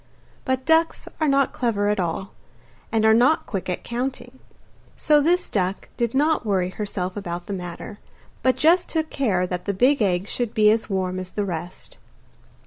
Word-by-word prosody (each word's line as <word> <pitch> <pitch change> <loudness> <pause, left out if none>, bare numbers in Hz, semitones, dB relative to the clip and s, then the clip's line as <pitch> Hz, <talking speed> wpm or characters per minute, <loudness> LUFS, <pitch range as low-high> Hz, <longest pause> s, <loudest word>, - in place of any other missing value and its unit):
But 260 0 -1
ducks 325 +1 +2
are 310 - +2
not 275 -1 +2
clever 215 -5 0
at 210 -1 0
all, 180 +3 -2 0.6
and 220 -1 +2
are 220 - +6
not 250 +8 +3
quick 190 -2 -4
at 180 - -3
counting, 250 +1 -4 0.6
so 300 -1 +4
this 350 +4 +2
duck 190 -1 -2
did 235 0 -1
not 305 +2 +2
worry 190 -4 0
herself 190 -2 -4
about 175 -4 -5
the 200 - -5
matter, 180 +3 -7 0.4
but 260 0 +3
just 345 +3 +3
took 315 -1 -2
care 200 -10 +1
that 180 0 -4
the 200 - -1
big 255 +6 +3
egg 185 -1 +1
should 240 0 -3
be 215 -1 +5
as 220 +1 0
warm 185 -1 -1
as 185 -1 -5
the 205 +2 -2
rest. 175 -1 -7
215 Hz, 180 wpm, -23 LUFS, 185-265 Hz, 0.6 s, are